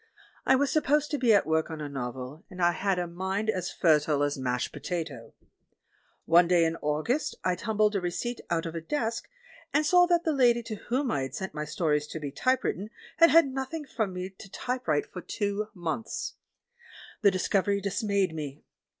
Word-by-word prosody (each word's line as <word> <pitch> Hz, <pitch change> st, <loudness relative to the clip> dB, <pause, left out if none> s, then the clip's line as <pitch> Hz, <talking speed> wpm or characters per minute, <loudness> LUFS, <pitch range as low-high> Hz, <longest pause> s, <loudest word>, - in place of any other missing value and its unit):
I -, -, +6 dB
was 275 Hz, 0 st, +1 dB
supposed 295 Hz, 0 st, +2 dB
to 295 Hz, -, -1 dB
be 245 Hz, -3 st, +4 dB
at 205 Hz, -2 st, +5 dB
work 160 Hz, +1 st, +1 dB
on 160 Hz, -1 st, -6 dB
a 150 Hz, -, -4 dB
novel, 130 Hz, +2 st, -6 dB
and 185 Hz, -2 st, -11 dB
I 175 Hz, -1 st, +4 dB
had 195 Hz, +1 st, 0 dB
a 180 Hz, -, 0 dB
mind 190 Hz, +5 st, -1 dB
as 185 Hz, -3 st, -3 dB
fertile 150 Hz, -3 st, +3 dB
as 145 Hz, 0 st, 0 dB
mashed 125 Hz, -2 st, -2 dB
potato. 155 Hz, -9 st, -5 dB, 0.9 s
One 170 Hz, +1 st, +6 dB
day 175 Hz, -1 st, +4 dB
in 165 Hz, 0 st, 0 dB
August 155 Hz, -, -1 dB
I 185 Hz, -, +2 dB
tumbled 215 Hz, +2 st, +1 dB
a 195 Hz, -, +1 dB
receipt 230 Hz, +7 st, -3 dB
out 165 Hz, -1 st, 0 dB
of 165 Hz, -, -4 dB
a 165 Hz, -, -4 dB
desk, 230 Hz, -, -2 dB, 0.4 s
and 300 Hz, +2 st, +2 dB
saw 355 Hz, +3 st, +6 dB
that 345 Hz, -1 st, +3 dB
the 320 Hz, -, +1 dB
lady 240 Hz, -3 st, +4 dB
to 220 Hz, -1 st, -5 dB
whom 255 Hz, +1 st, +1 dB
I 135 Hz, -1 st, -1 dB
sent 190 Hz, +8 st, -5 dB
my 150 Hz, 0 st, -3 dB
stories 150 Hz, -1 st, 0 dB
to 160 Hz, -, -6 dB
be 145 Hz, -2 st, -5 dB
typewritten 215 Hz, -, 0 dB, 0.3 s
had 335 Hz, 0 st, +7 dB
had 330 Hz, -4 st, +6 dB
nothing 270 Hz, +4 st, -4 dB
from 220 Hz, -7 st, -2 dB
me 180 Hz, +1 st, -5 dB
to 195 Hz, -, -11 dB
type 250 Hz, +6 st, -4 dB
write 150 Hz, -2 st, +2 dB
for 180 Hz, -, -8 dB
two 205 Hz, +1 st, -2 dB
months. 175 Hz, +5 st, -3 dB, 0.9 s
The 205 Hz, -, +6 dB
discovery 200 Hz, +1 st, +1 dB
dismayed 200 Hz, -2 st, 0 dB
me. 150 Hz, -2 st, -6 dB
190 Hz, 195 wpm, -28 LUFS, 160-240 Hz, 0.9 s, had